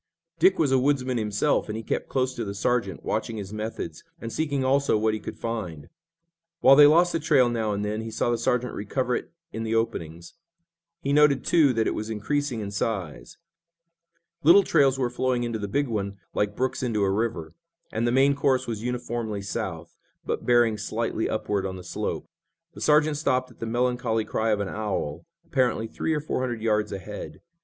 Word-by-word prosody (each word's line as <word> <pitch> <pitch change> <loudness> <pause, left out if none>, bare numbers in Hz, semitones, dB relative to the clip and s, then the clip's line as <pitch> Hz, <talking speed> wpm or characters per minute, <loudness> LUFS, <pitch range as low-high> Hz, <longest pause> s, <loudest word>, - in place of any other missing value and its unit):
Dick 185 +3 +5
was 150 -4 +2
a 135 - +4
woodsman 130 -2 +1
himself, 105 +7 +1
and 105 - -3
he 115 - -6
kept - - -3
close 130 -1 0
to 120 - -4
the 100 -2 -5
sergeant, 100 -2 -1
watching 110 +1 -2
his 100 -1 -6
methods, 110 +1 -5 0.2
and 115 -1 -6
seeking 145 -4 -1
also 140 -3 +3
what 110 0 +1
he 110 - -2
could - - -7
find. 90 -10 -5 0.7
While 135 +1 +7
they 145 +1 +9
lost 170 +4 +5
the 165 - +1
trail 140 -5 +4
now 110 -3 -1
and 100 0 -2
then, 105 +1 -2
he 115 - -5
saw 120 - 0
the 120 - +1
sergeant 125 +1 0
recover 125 +4 -1
it - - -5 0.2
in 110 - -4
the 115 0 -1
openings. 85 -7 -3 0.7
He 140 - 0
noted, 145 -3 +4
too, 155 -5 +4
that 115 -1 +1
it - - 0
was 110 +1 -4
increasing 125 +3 -2
in 100 -1 -5
size. 100 -6 -3 1.0
Little 175 +5 +7
trails 140 -6 +3
were 125 -2 0
flowing 125 0 0
into 115 -2 -2
the 100 - -3
big 140 +8 0
one 100 -3 -3 0.2
like 105 0 0
brooks 130 0 -1
into 115 -5 0
a 95 - +2
river, 100 -6 -2 0.4
and 115 +2 0
the - - +2
main 135 +3 +4
course 140 -2 +1
was 115 -3 -4
uniformly 120 -4 -3
south, 85 -4 -5 0.3
but - - -3
bearing 120 -3 +4
slightly 110 +1 -2
upward 105 -2 -1
on 95 -1 -3
the 90 - -9
slope. 90 - -4 0.5
The - - -11
sergeant 150 0 +3
stopped 130 -4 0
at 120 - -20
the 115 - -4
melancholy 120 -1 0
cry 110 +1 -1
of 105 -2 +1
an 100 - -2
owl, 105 - -3 0.2
apparently 125 -6 +1
three 160 +7 -2
or - - 0
four 150 - -2
hundred 120 -3 -3
yards 105 -2 +1
ahead. 100 +1 -7
115 Hz, 200 wpm, -26 LUFS, 105-130 Hz, 1.0 s, they